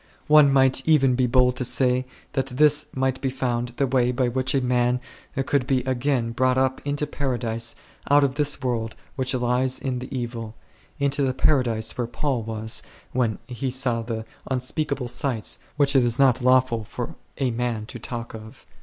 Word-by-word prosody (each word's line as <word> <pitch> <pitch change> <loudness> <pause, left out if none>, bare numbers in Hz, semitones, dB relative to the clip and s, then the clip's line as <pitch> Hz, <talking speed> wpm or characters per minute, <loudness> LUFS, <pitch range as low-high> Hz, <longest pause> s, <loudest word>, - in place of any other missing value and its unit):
One 150 -2 +6
might 135 -1 +4
even 135 -5 +5
be 125 0 +2
bold 125 0 +3
to - - -1
say 125 0 +1 0.3
that 135 -2 0
this 150 +3 +3
might 130 0 -1
be 135 - 0
found 125 -2 -1
the 140 - +2
way 125 -1 +2
by 125 0 +1
which 130 +2 0
a - - +4
man 125 0 +1 0.5
could 130 -1 +1
be 130 -2 +2
again 130 -2 0
caught 130 +1 +2
up 130 0 +1
into 145 +1 -1
Paradise 120 -5 -2 0.3
out 145 0 +6
of 135 -2 +1
this 145 -1 +1
world 115 -3 -2 0.2
which 130 -1 -1
lieth 125 +1 +1
in 130 -3 -2
the 125 - -7
Evil, 115 -3 -5 0.4
into 140 0 +1
that 130 -1 0
Paradise 115 -6 +1
where 120 - 0
Paul 130 +1 -1
was 110 0 -2 0.3
when 120 -4 0
he 130 +2 -4
saw 125 -2 0
the 110 -1 -4 0.2
un 130 -1 +1
speakable 140 0 -3
sights 120 -3 -1 0.2
which 140 -1 +3
it 130 - +6
is 120 0 +2
not 135 -3 +4
lawful 125 -2 +3
for - - -6 0.2
a 130 -2 0
man 115 -2 -2
to 120 - -9
talk 115 +1 -6
of4. 110 0 -11
130 Hz, 185 wpm, -24 LUFS, 120-135 Hz, 0.5 s, One